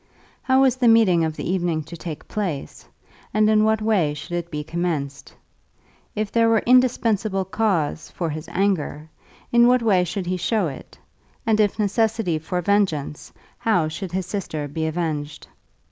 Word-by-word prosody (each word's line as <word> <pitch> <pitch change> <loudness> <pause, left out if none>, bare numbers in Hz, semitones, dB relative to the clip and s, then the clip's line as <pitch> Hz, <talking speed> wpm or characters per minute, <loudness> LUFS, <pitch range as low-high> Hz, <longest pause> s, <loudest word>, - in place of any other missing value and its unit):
How 260 0 +3
was 260 -2 +3
the 250 -2 +2
meeting 215 -7 +5
of 160 -1 -2
the - - -5
evening 170 -3 0
to 165 +3 -10
take 165 -2 -8
place, 180 -10 -5 0.5
and 215 0 +4
in 215 0 +4
what 220 0 +1
way 185 -9 +1
should 165 +4 -9
it 175 0 -3
be 150 -3 -4
commenced? 155 -4 -4 0.8
If 210 -1 -2
there 230 -1 +3
were 225 -1 +3
indispensable 225 -6 +2
cause 180 -6 -1
for 165 -3 -3
his 155 +2 -7
anger, 160 -5 -1 0.4
in 235 0 +6
what 250 -1 +3
way 195 -5 +3
should 180 +2 -4
he 180 +1 -1
show 210 +2 0
it, 135 -5 -8 0.5
and 220 -1 +2
if 205 -2 +2
necessity 215 -4 0
for 180 +3 -3
vengeance, 170 -7 0 0.3
how 180 -8 +1
should 175 +3 -6
his 185 0 -2
sister 170 -6 -4
be 160 +2 -3
avenged? 155 -3 -3
185 Hz, 165 wpm, -22 LUFS, 160-215 Hz, 0.8 s, in